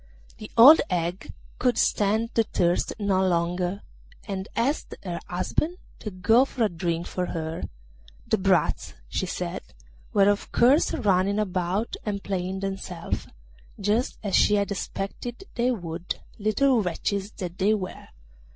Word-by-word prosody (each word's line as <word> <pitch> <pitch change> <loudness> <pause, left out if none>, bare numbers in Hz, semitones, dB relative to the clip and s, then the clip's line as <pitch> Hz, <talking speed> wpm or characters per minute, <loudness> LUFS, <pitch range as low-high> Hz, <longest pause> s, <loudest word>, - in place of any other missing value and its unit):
The 215 - -8
old 275 +8 +10
hag 175 +1 -2 0.3
could 250 -2 +2
stand 220 +3 +2
the 230 - +4
thirst 175 -5 +1
no 200 -3 +1
longer, 180 +2 0 0.4
and 195 -1 -4
asked 270 +6 -1
her 175 -3 -4
husband 305 - -1 0.2
to 215 - -5
go 220 +6 +4
for 260 -3 -2
a 215 - +3
drink 170 0 -2
for 180 -1 -3
her; 160 -1 -4 0.6
the 220 - +1
brats, 185 -5 +1
she - - -2
said, - - -4 0.5
were 200 -1 +4
of 205 0 +1
course 260 +6 +4
running 195 0 +2
about 190 +1 -1
and 200 -2 -3
playing 190 0 -3
themselves, 190 -3 -4 0.5
just 210 +5 0
as 200 -3 0
she 210 - +5
had 200 0 0
expected 200 - -5
they 245 +1 +1
would, 175 -6 -3 0.2
little 225 +4 +3
wretches 195 +2 -2
that 180 -2 -6
they 205 +3 +4
were. 185 -3 -6
195 Hz, 140 wpm, -26 LUFS, 180-220 Hz, 0.6 s, old